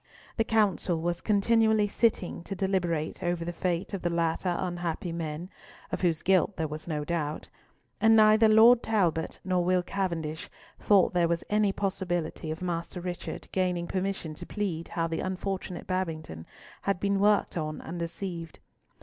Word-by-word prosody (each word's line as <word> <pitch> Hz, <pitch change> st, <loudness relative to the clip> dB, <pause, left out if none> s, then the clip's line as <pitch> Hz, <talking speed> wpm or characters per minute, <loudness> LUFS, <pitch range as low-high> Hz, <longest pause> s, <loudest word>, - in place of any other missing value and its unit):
The 225 Hz, -, +2 dB
Council 205 Hz, -6 st, +1 dB
was 175 Hz, +1 st, -2 dB
continually 220 Hz, 0 st, +3 dB
sitting 205 Hz, -5 st, 0 dB
to 195 Hz, -, -4 dB
deliberate 175 Hz, -5 st, -1 dB
over 175 Hz, -2 st, -1 dB
the 175 Hz, -, -3 dB
fate 175 Hz, +2 st, -2 dB
of 195 Hz, -, -3 dB
the 175 Hz, -, 0 dB
latter 170 Hz, +1 st, 0 dB
unhappy 175 Hz, -1 st, -3 dB
men, 165 Hz, +2 st, -5 dB, 0.4 s
of -, -, -2 dB
whose 170 Hz, -4 st, +1 dB
guilt 190 Hz, +1 st, +3 dB
there 160 Hz, -2 st, -1 dB
was 155 Hz, +2 st, -7 dB
no 150 Hz, -3 st, -2 dB
doubt; 155 Hz, -2 st, -3 dB, 0.5 s
and 225 Hz, 0 st, +6 dB
neither 215 Hz, 0 st, +6 dB
Lord 230 Hz, +3 st, +7 dB
Talbot 180 Hz, -7 st, 0 dB
nor 185 Hz, -1 st, +1 dB
Will 180 Hz, 0 st, +2 dB
Cavendish 170 Hz, -5 st, -3 dB, 0.3 s
thought 200 Hz, -3 st, +4 dB
there 175 Hz, -1 st, +3 dB
was 170 Hz, 0 st, -1 dB
any 210 Hz, -1 st, +3 dB
possibility 175 Hz, -5 st, -2 dB
of 160 Hz, +3 st, -4 dB
Master 170 Hz, 0 st, -3 dB
Richard 175 Hz, 0 st, -5 dB
gaining 180 Hz, -2 st, 0 dB
permission 190 Hz, -3 st, -3 dB
to -, -, -9 dB
plead 180 Hz, -6 st, -3 dB
how 165 Hz, -, -1 dB
the 165 Hz, 0 st, -2 dB
unfortunate 185 Hz, -1 st, -4 dB
Babington 160 Hz, -, -3 dB, 0.3 s
had 195 Hz, -3 st, 0 dB
been 200 Hz, 0 st, +1 dB
worked 205 Hz, +1 st, +3 dB
on 155 Hz, -2 st, -3 dB
and 170 Hz, +1 st, -6 dB
deceived. 170 Hz, -1 st, -5 dB
180 Hz, 160 wpm, -28 LUFS, 165-195 Hz, 0.5 s, Lord